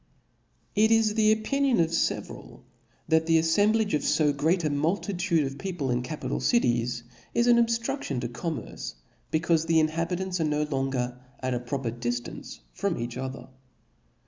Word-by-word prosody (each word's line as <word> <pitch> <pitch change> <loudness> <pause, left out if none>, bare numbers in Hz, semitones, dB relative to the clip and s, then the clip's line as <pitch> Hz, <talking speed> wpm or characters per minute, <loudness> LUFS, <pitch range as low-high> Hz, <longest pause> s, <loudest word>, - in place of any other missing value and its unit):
It 215 +1 +4
is 225 -1 +4
the 215 -1 +4
opinion 260 +4 +1
of 165 -1 +2
feveral, 165 - -2 0.5
that 160 0 +3
the 165 0 +5
aflembling 205 +2 +2 0.2
fo 150 -2 +3
great 165 +5 +1
a 155 - +1
multitude 170 +2 0
of 135 +1 -6
people 175 -9 -2
in 120 0 +1
capital 130 0 -4
cities, 120 - +1 0.3
is 235 0 +3
^n 235 -1 +6
obftrudtion 230 - -2
to 120 - -2
commerce, 120 - -5 0.4
becayfe 165 0 +1
the 165 -1 +4
inhabit 165 +3 0
ants 185 -2 -2
are - - +2
no 150 0 +1
longer 135 -4 -2 0.2
at 130 0 -1
a 120 - -1
proper 125 -1 -3
diftance 120 - -5
from - - -1
each 120 0 -4
other. 130 +1 -6
160 Hz, 155 wpm, -27 LUFS, 130-195 Hz, 0.5 s, ^n